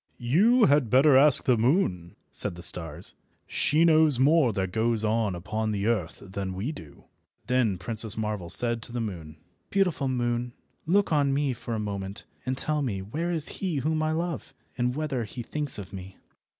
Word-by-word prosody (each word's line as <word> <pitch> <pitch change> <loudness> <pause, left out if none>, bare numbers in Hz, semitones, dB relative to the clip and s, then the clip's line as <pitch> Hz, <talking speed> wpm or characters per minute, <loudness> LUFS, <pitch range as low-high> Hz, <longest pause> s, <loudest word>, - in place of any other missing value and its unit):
"You 205 - +4
had 140 -4 +3
better 135 +4 +5
ask 140 +1 +6
the 125 -4 +2
moon," 110 - +1 0.2
said - - -1
the 85 - -9
stars. 80 -3 -3 0.3
"She 155 +3 +2
knows 155 -4 +5
more 140 0 +4
that 95 -3 -2
goes 110 +1 0
on 110 -3 0
upon 105 +5 -3
the 100 -1 -2
earth 105 -8 -1
than 95 0 -5
we 105 +10 -3
do." 80 - -12 0.4
Then 125 -6 +1
Princess 110 +3 -1
Marvel 105 -5 -3
said 115 +4 +2
to 115 - -8
the 120 - -3
moon— 85 -9 -6 0.3
"Beautiful 180 -8 +1
moon, 120 -1 -1 0.3
look 195 0 +2
on 140 -2 +2
me 140 -2 0
for 115 -1 -5
a - - -2
moment, 100 -2 -4 0.2
and 130 0 -1
tell 150 +1 -1
me 100 -8 -2
where 155 - -3
is 165 -3 0
he 185 -5 -1
whom 155 +3 0
I 155 0 0
love, 170 +1 -4 0.2
and 125 0 -1
whether 150 -5 -2
he 120 +3 -7
thinks 150 +2 -3
of 100 -2 -9
me." 95 0 -9
120 Hz, 185 wpm, -27 LUFS, 100-150 Hz, 0.4 s, ask